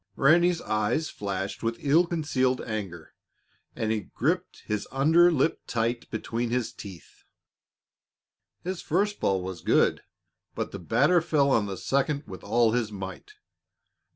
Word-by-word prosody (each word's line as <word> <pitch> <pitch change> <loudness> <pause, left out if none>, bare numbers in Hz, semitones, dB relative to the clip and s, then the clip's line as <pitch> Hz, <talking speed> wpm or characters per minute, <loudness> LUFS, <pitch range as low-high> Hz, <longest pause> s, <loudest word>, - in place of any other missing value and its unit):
Ranny's 170 +4 +4
eyes 110 +9 0
flashed 100 -1 -4
with 115 0 -1
ill 160 +5 +3
concealed 135 -6 0
anger, 95 -7 -6 0.6
and 110 -1 -1
he 110 -2 -3
gripped 175 +8 -1
his 105 -1 -3
under 160 +6 +5
lip 155 0 +1
tight 115 +1 -1
between 115 +1 -3
his 120 -1 -1
teeth. 95 -6 -12 1.4
His 185 0 -4
first 205 +6 0
ball 95 -2 +1
was 90 -3 -6
good, - - +2 0.5
but - - -3
the - - -6
batter 175 -1 +3
fell 145 -4 +2
on 110 -5 +2
the 95 -1 -5
second 140 - 0
with 95 - -10
all 115 +2 +3
his 115 -2 -1
might. 100 - -8
120 Hz, 140 wpm, -27 LUFS, 105-160 Hz, 1.4 s, under